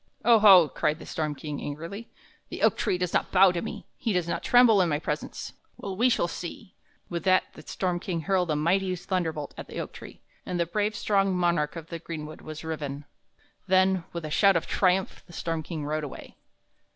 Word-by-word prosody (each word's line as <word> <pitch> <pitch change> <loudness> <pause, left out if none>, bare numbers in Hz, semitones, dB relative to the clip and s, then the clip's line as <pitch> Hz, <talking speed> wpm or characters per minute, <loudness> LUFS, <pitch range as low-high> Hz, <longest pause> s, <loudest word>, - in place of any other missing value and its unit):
"Oho!" 205 -7 +8
cried 150 +1 -1
the - - -11
storm 155 -2 -3
king, 145 0 -6
angrily, 165 +10 -6 0.4
"the - - -5
oak - - +5
tree 180 - 0
does 180 -1 -2
not - - 0
bow 190 0 +6
to 175 -1 -3
me, - - -6
he 225 - -1
does 180 -2 0
not - - -2
tremble 245 -5 +5
in 175 - +2
my 150 - +1
presence. 150 - -5 0.2
Well, 195 -2 -5
we 240 +6 +3
shall 200 -7 +1
see." 180 +4 -8 0.3
With 170 -2 -4
that 185 0 +5
the - - -12
storm 180 +2 -2
king 170 -2 -3
hurled 180 +1 +1
a 155 - +1
mighty 185 +5 +1
thunderbolt 165 -5 -3
at - - -7
the - - -6
oak - - -5
tree, - - -12 0.2
and 180 - -3
the 170 - +2
brave, 210 +5 -1
strong 195 -2 +1
monarch 170 -4 +1
of 165 0 -8
the 170 - -5
greenwood 155 -2 -7
was 155 0 -8
riven. 145 -3 -5 0.6
Then, 190 -1 +3
with 170 -2 -5
a 155 - -6
shout 195 +4 +5
of 170 - 0
triumph, 190 0 +1
the 175 - -14
storm 165 -2 -3
king 155 -1 -5
rode 155 +1 -2
away. 145 - -9
175 Hz, 210 wpm, -27 LUFS, 155-190 Hz, 0.6 s, Oho